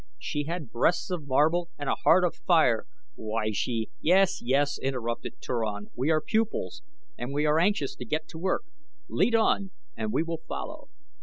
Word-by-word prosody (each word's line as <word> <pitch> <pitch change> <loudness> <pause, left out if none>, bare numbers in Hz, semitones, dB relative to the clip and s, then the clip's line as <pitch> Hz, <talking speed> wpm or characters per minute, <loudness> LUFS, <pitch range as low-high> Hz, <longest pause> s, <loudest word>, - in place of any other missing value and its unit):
She 145 -1 -3
had 165 -5 -4
breasts 170 +10 +1
of 165 -5 -3
marble 160 +6 +3
and 145 - -5
a - - +3
heart 180 +2 +4
of 175 - +2
fire. 155 -10 +3 0.3
Why, 110 0 -2
she 110 +1 -2
" - - -45
"Yes, 185 +3 +4
yes," 140 +3 +1
interrupted 125 -3 -3
Turan; 105 -4 -3
"we 130 +5 0
are 155 -1 +4
pupils, 225 - -1 0.4
and 120 +2 -4
we 145 +2 0
are 150 +1 +4
anxious 180 -6 +1
to 125 - -6
get 155 +6 -2
to 160 - -8
work. 185 +2 0 0.5
Lead 230 +4 +2
on 205 -3 +2 0.3
and 215 - -2
we 165 - +2
will 165 -1 -4
follow." - - -6
150 Hz, 180 wpm, -28 LUFS, 125-175 Hz, 0.5 s, heart